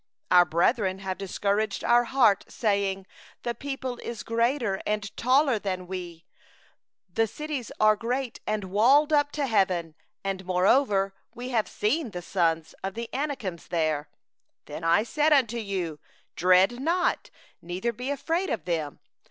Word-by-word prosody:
our 180 -1 +7
brethren 185 +4 +1
have 190 -1 -5
made 200 +2 -1
our 240 0 +4
heart 230 -6 +4
to - - -18
melt, - - -19
saying: 200 -3 0 0.4
The 240 - -1
people 260 0 -5
is 235 -2 -6
greater 230 -3 0
and 210 -1 -3
taller 260 -1 +3
than 185 -2 -3
we; 175 -2 -7 0.9
the 225 +3 +2
cities 295 -1 -5
are 215 0 +5
great 245 +3 -3
and 215 -1 -1
fortified 250 +11 +4
up 290 -1 +3
to 290 -2 -1
heaven; 185 -8 +1 0.3
and 195 -1 -3
moreover 195 +2 +2 0.2
we 245 +2 -6
have 230 -4 +1
seen 260 +6 -1
the 180 -3 -7
sons 165 -4 0
of 195 0 -4
the 230 0 -5
Anakim 265 - -3
there.' 155 -3 0 0.6
29Then 165 - -8
I 170 +5 +4
said 300 +6 +2
unto 240 -5 +2
you: 185 -8 -3 0.4
'Dread 185 +7 +4
not, 345 +6 0 0.3
neither 185 +7 -3
be 250 +4 -5
afraid 330 +6 -1
of 190 -9 -3
them. 160 -5 -3
210 Hz, 150 wpm, -27 LUFS, 185-255 Hz, 0.9 s, our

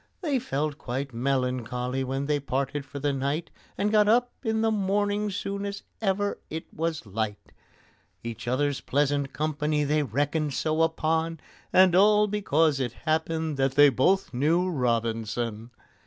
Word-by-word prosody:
They 295 -7 +1
felt 145 - -2
quite 130 +2 -4
melancholy 125 0 -1
when 135 +2 -2
they 145 0 +1
parted 140 +1 -2
for 140 - -8
the 140 0 0
night, 140 +5 -2 0.3
And 205 +1 +1
got 210 -1 +4
up 245 +3 +3
in 220 -2 0
the 225 0 +2
morning 205 +1 0
soon 200 0 -4
as 200 0 -5 0.2
ever 200 0 0
it 160 +1 -5
was 165 -3 -2
light; 105 0 -4 0.7
Each 115 0 -6
other's 140 +3 0
pleasant 145 0 0
company 150 0 -1
they 150 +1 +2
reckoned 145 +3 -1
so 155 +1 0
upon, 160 0 0 0.3
And 185 -1 +6
all 210 +2 +6
because 165 -8 +1
it 120 -3 -2
happened 160 -1 0
that 135 0 +1
they 145 +1 +7
both 140 +8 +2
knew 165 +8 +2
ROBINSON! 115 -3 -1
150 Hz, 150 wpm, -27 LUFS, 130-185 Hz, 0.7 s, they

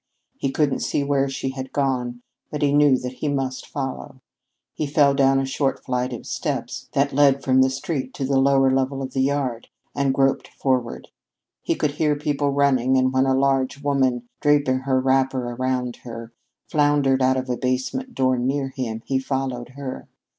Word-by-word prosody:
He 135 - -2
couldn't 140 0 +1
see 145 - -1
where 140 -1 +1
she 135 0 -3
had 130 0 -6
gone, 125 -3 -1 0.3
but 150 0 -3
he 140 -1 +3
knew 145 -2 +5
that 125 0 -5
he 150 - -3
must 135 -2 -2
follow. 135 0 -5 0.5
He 150 - -3
fell 140 -1 +4
down 135 -1 +3
a 135 - 0
short 135 +1 -1
flight 125 0 -1
of 120 - -7
steps - - -4
that 140 0 +1
led 140 -1 +4
from 130 0 +4
the 130 - +4
street 135 0 -3
to 135 - -2
the 135 0 +2
lower 135 0 +4
level 135 +1 0
of 130 - -6
the 130 - +1
yard, 135 -4 -1 0.3
and 140 -1 +1
groped 135 0 +1
forward. 130 -3 -2 0.5
He - - -1
could 150 - 0
hear 150 0 +1
people 145 -1 -1
running, 130 -2 +2
and 130 0 +2
when 130 +1 +3
a 130 - +3
large 135 0 +1
woman, 130 -4 +1
draping 145 -3 +2
her 130 0 +1
wrapper 130 -1 +1
about 125 0 -2
her, 115 -1 -9 0.3
floundered 145 -3 +2
out 130 0 +3
of 130 0 -3
a 125 - -1
basement 130 - -2
door 130 -1 +2
near 135 +2 -1
him, 120 -4 -5
he 135 -1 0
followed 130 -2 -3
her. 140 -2 -6
135 Hz, 185 wpm, -23 LUFS, 130-140 Hz, 0.5 s, knew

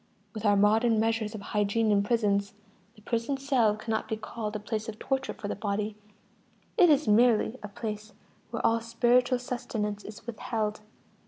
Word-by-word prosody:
With 220 -1 -5
our 205 - +5
modern 220 +2 +4
measures 225 -1 0
of 210 - -6
hygiene 210 +2 +1
in 200 -1 +4
prisons, 200 -2 +1 0.4
the 210 - -19
prison 235 +5 -1
cell 260 -6 +2
cannot 220 +1 -3
be 220 - -2
called 215 0 -5
a - - -2
place 215 +1 -4
of 215 - -7
torture 270 +2 -2
for 205 - -6
the - - -2
body: 205 +1 -2 0.8
it 360 -6 +6
is 290 -4 +3
merely 230 +2 +4
a 210 - -6
place 210 +1 -6 0.4
where 230 - -3
all 230 0 +3
spiritual 245 +2 +3
sustenance 215 -4 -4
is 210 - -10
withheld. 215 -2 -3
220 Hz, 170 wpm, -28 LUFS, 210-235 Hz, 0.8 s, it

